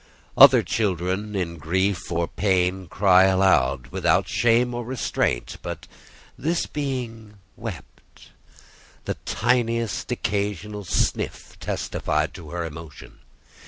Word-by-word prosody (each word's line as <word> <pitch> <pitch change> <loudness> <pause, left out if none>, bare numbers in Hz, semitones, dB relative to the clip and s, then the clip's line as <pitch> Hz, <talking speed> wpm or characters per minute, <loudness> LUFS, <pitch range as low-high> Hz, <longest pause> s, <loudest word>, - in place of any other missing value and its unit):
Other - - +8
children 100 0 -1
in 85 -3 -3
grief 95 +4 -1
or 85 0 0
pain 95 -2 0
cry 95 +1 +5
aloud, 95 -10 +2
without - - +2
shame 120 +1 +2
or 120 0 -3
restraint; 120 - -2
but - - -6 0.5
this 165 +4 -1
being 120 -7 -5 0.2
wept: 105 - -10 0.7
the - - -1
tiniest 115 -1 0
occasional 105 0 -2
sniff - - -1
testified 75 0 -2
to 80 -4 -10
her 85 +1 -3
emotion. 80 -1 -10
95 Hz, 105 wpm, -24 LUFS, 85-115 Hz, 0.7 s, Other